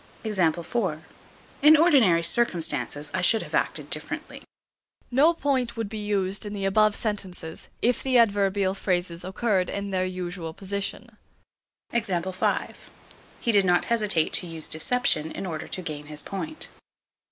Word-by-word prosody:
In 185 - +1
ordinary 255 - +5
circumstances 165 -8 0
I 185 - 0
should 215 +5 +4
have - - -12
acted - - 0
differently. - - -3 0.7
No 280 +7 +5
point 260 -7 -1
would 225 -3 -3
be 215 -1 -5
used 200 -1 -1
in 205 -1 -6
the 200 -1 -3
above 215 +2 +3
sentences, 185 -6 -4 0.2
if 245 0 +2
the 260 -2 +2
adverbial 200 -4 +2
phrases 175 -3 -2
occurred 190 0 0
in 200 0 -4
their 185 -1 0
usual 180 -3 -5
position. 200 +3 -5 0.7
He 235 - +3 1.5
did 200 -2 +5
not 175 -1 +3
hesitate 210 -8 +2
to 180 - +2
use 165 -2 -4
deception 160 -3 +2
in - - -5
order 160 -4 -5
to 185 - -4
gain 150 -3 -6
his 150 -1 -3
point. 310 +11 -5
195 Hz, 135 wpm, -25 LUFS, 175-225 Hz, 1.5 s, ordinary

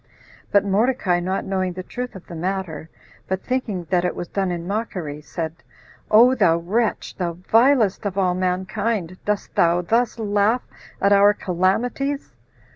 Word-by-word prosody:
But 200 -1 +4
Mordecai, 200 -3 +2
not 185 +2 -2
knowing 185 -2 -1
the 185 +1 -6
truth 250 +4 -6
of 185 - -10
the - - -10
matter, 170 -2 -4 0.4
but 190 0 -2
thinking 240 -8 -2
that 180 -1 +3
it 180 - -1
was 175 - -5
done 195 -2 -1
in 170 -1 -4
mockery, 180 -7 -4
said, 160 +1 -5 0.5
"O 240 +4 +7
thou 185 -10 +3
wretch, 210 +7 -1
the 175 -2 -2
vilest 220 +3 +3
of 195 -1 -5
all 185 -2 +2
mankind, 185 +1 -2
dost 210 -1 -2
thou 170 +1 +3
thus 230 +5 +1
laugh 210 +2 +1 0.4
at 200 0 +4
our 200 +1 +6
calamities?" 235 - -1
190 Hz, 155 wpm, -22 LUFS, 180-220 Hz, 0.5 s, O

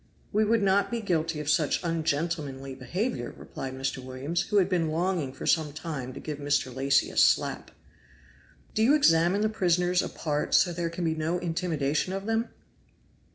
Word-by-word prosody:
"We 215 +1 +3
would 220 0 +2
not 200 +1 +3
be 235 - -2
guilty 165 -6 -1
of 150 - -7
such 150 0 +2
ungentlemanly 155 -4 -2
behavior!" 135 - -3
replied 130 -1 -7
Mr. 135 0 -3
Williams, 135 +6 -2
who 210 - +1
had 190 -3 +4
been 175 -4 0
longing 165 -3 -1
for 135 - -8
some 155 -3 +2
time 150 -5 -5
to - - -8
give 150 -2 -6
Mr. 145 -3 0
Lacy 135 +1 +2
a - - -10
slap. - - +3 1.0
"Do 220 - 0
you 260 +7 +5
examine 175 - +4
the 215 - +3
prisoners 180 -3 +2
apart, 150 -2 -1
so 180 - +4
that 170 - -8
there 170 -1 -1
can 170 +1 -5
be 160 - +1
no 160 +2 -1
intimidation 165 -2 -1
of 195 +1 -4
them?" 225 +1 0
165 Hz, 180 wpm, -27 LUFS, 145-185 Hz, 1.0 s, you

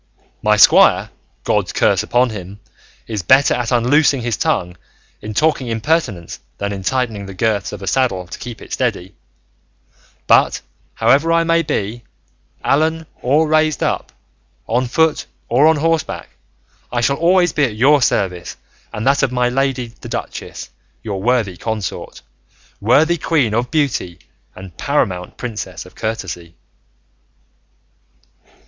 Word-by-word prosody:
My 105 0 +3
squire, 100 - +6 0.3
God's - - 0
curse - - +2
upon 125 0 +1
him, 100 -1 -8 0.5
is 110 -3 -4
better 130 +11 +4
at 120 0 -2
unloosing 130 +3 +3
his 120 -2 -1
tongue 90 -3 -1 0.5
in 105 0 -7
talking 150 -3 +1
impertinence 115 - -1 0.2
than 100 0 -3
in 95 - -5
tightening 110 -2 -2
the 95 - -9
girths 100 -1 0
of 100 -1 -8
a - - -4
saddle 100 -5 0
to 90 - -9
keep 120 -2 -8
it - - -9
steady; 105 -7 -2 1.1
but - - +3 0.3
however 145 +5 +3
I 165 0 +3
may 165 0 +2
be, 115 -5 -3 0.6
fallen 160 +3 +1 0.2
or 150 +6 +2
raised 155 0 +2
up, - - -2 0.5
on 125 +3 0
foot 160 +4 +1 0.2
or 135 +6 +4
on 160 - +5
horseback, 165 +1 -1 0.6
I 120 - 0
shall 140 +3 +1
always 175 0 +3
be 150 - +2
at 115 -5 -4
your 140 +6 +4
service 90 -7 -1 0.3
and 105 - -5
that 140 +1 +3
of 135 -3 +1
my 125 -1 +1
lady 130 -1 -1
the - - -8
duchess, - - -6 0.3
your 100 -4 -4
worthy 115 -5 0
consort, 110 -1 -5 0.6
worthy 155 +10 +3
queen 140 -9 +1
of 120 +2 0
beauty 130 - -1 0.4
and 95 -3 -11
paramount 90 -2 -1
princess 115 -4 -6
of - - -15
courtesy." 90 -6 -5
120 Hz, 140 wpm, -18 LUFS, 100-145 Hz, 1.1 s, squire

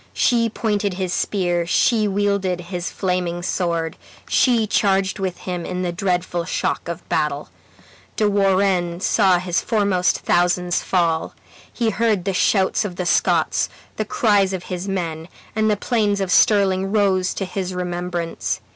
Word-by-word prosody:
She 230 -2 +2
pointed 205 -3 -1
his 185 -1 -2
spear, 175 -4 0
she 215 +3 +2
wielded 200 -2 0
his 180 0 -5
flaming 180 -2 -2
sword, 170 -3 -1 0.3
she 235 -4 +3
charged 195 -2 +1
with 185 -2 -2
him 180 -2 -5
in 180 +1 -3
the 175 - -1
dreadful 180 -2 -1
shock 170 - -2
of 170 0 -6
battle. 150 -1 -1 0.7
De 215 - +2
Warenne 190 -3 +1
saw 190 -2 +3
his 175 0 -1
foremost 200 -5 +1
thousands 175 0 +1
fall. 170 -3 0 0.4
He 230 -2 0
heard 215 -4 0
the 195 - 0
shouts 190 +3 +2
of 195 -4 -5
the 180 - -3
Scots, - - +2 0.3
the 215 - 0
cries 205 -3 +2
of 185 -2 -4
his 180 +2 -4
men, 165 -4 -3 0.3
and 220 0 +2
the 210 - +1
plains 210 -3 0
of 190 -2 -2
Stirling 195 -1 +3
rose 195 -3 +2
to 195 - -2
his 185 0 -4
remembrance. 175 -1 -3
185 Hz, 150 wpm, -21 LUFS, 175-200 Hz, 0.7 s, she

